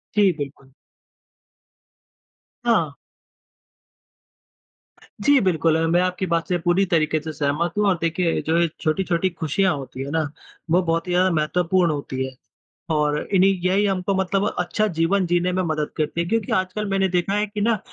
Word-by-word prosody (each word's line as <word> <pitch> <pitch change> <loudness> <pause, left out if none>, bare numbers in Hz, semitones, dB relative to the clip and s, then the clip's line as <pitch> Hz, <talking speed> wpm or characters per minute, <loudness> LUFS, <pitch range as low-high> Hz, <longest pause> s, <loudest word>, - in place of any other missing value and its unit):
जी, 205 -2 +5
बिल्कुल। 140 -2 -7 1.9
हाँ। 170 -12 +2 2.3
जी, 285 -1 +5
बिल्कुल 165 -4 +2
अ, 165 - +1
मैं 175 +2 +3
आपकी 185 +1 -1
बात 170 -2 -1
से 180 - +1
पूरी 175 +3 +2
तरीके 155 -2 +2
से 160 +1 -6
सहमत 150 +4 -1
हूँ 210 - +2
और 185 - +2
देखिए 165 +1 0
जो 165 - +2
ये 170 - +3
छोटी-छोटी 175 +2 0
खुशियाँ 175 +2 0
होती 135 -1 -7
है 140 - -6
ना, 160 -1 +1 0.5
वो 180 - +4
बहुत 165 0 -1
ही 180 - -2
ज़्यादा 185 +1 +3
महत्वपूर्ण 170 +3 +1
होती 135 -3 -3
है। 130 - -8 0.6
और 150 -1 +1 0.2
इन्ही 190 +1 +5
यही 195 +3 +2
हमको 190 0 0
मतलब 195 +1 0
अच्छा 215 +4 0
जीवन 185 +3 +2
जीने 175 +1 +1
में 185 +1 0
मदद 155 -3 -1
करती 155 +2 -1
है, 170 - -1
क्योंकि 225 -1 -1
आजकल 190 +3 -1
मैंने 195 -1 +2
देखा 180 +2 0
है 210 +1 +1
कि 205 0 -6
ना, 225 +1 +2
175 Hz, 165 wpm, -22 LUFS, 160-190 Hz, 2.3 s, जी